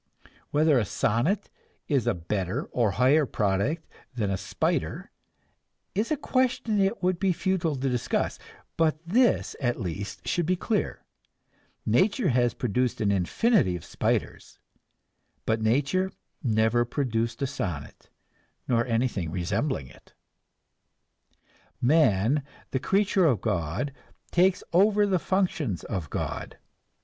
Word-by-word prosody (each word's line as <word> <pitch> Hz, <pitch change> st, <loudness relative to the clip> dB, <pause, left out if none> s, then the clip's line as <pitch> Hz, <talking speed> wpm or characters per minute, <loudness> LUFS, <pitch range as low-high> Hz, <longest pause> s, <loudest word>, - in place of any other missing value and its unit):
Whether 150 Hz, -2 st, +4 dB
a -, -, +1 dB
sonnet 120 Hz, -, 0 dB, 0.4 s
is 140 Hz, -6 st, +1 dB
a -, -, +2 dB
better 95 Hz, -, -2 dB
or 120 Hz, -4 st, +2 dB
a -, -, -3 dB
higher 135 Hz, +6 st, +4 dB
product 105 Hz, -, 0 dB, 0.3 s
than 105 Hz, -5 st, -1 dB
a -, -, +1 dB
spider 100 Hz, +1 st, -2 dB, 0.8 s
is 210 Hz, +4 st, 0 dB
a 310 Hz, -, +1 dB
question 255 Hz, -5 st, 0 dB
it 195 Hz, +1 st, +1 dB
would 180 Hz, -1 st, +1 dB
be 195 Hz, -1 st, +2 dB
futile 180 Hz, -3 st, 0 dB
to 135 Hz, +1 st, -2 dB
discuss; 125 Hz, -2 st, -1 dB, 0.4 s
but 160 Hz, -2 st, +2 dB
this, 235 Hz, +8 st, +2 dB
at 120 Hz, -2 st, 0 dB
least, 95 Hz, 0 st, -5 dB
should 175 Hz, -3 st, 0 dB
be 185 Hz, -, +3 dB
clear 210 Hz, +3 st, -2 dB, 0.8 s
nature 190 Hz, -, +2 dB
has 120 Hz, -1 st, +2 dB
produced 125 Hz, +1 st, 0 dB
an 105 Hz, -2 st, +2 dB
infinity 100 Hz, -, +2 dB
of 85 Hz, -, -7 dB
spiders, -, -, -2 dB, 0.9 s
but 110 Hz, 0 st, 0 dB
nature 145 Hz, +12 st, +1 dB, 0.3 s
never 110 Hz, -1 st, +2 dB
produced 115 Hz, -1 st, -2 dB
a -, -, +3 dB
sonnet, 100 Hz, -, -5 dB, 0.6 s
nor 120 Hz, -2 st, +2 dB
anything 115 Hz, -7 st, 0 dB
resembling 95 Hz, -, -1 dB
it. -, -, -19 dB, 1.6 s
Man, 130 Hz, -2 st, +3 dB, 0.3 s
the 130 Hz, -, 0 dB
creature 195 Hz, +1 st, +2 dB
of 125 Hz, -9 st, +2 dB
God, 90 Hz, -, -2 dB, 0.4 s
takes 180 Hz, +1 st, +3 dB
over 205 Hz, +3 st, +5 dB
the 190 Hz, -3 st, +1 dB
functions 160 Hz, -, -1 dB
of 90 Hz, -8 st, -4 dB
God. -, -, -4 dB
130 Hz, 125 wpm, -27 LUFS, -, 1.6 s, over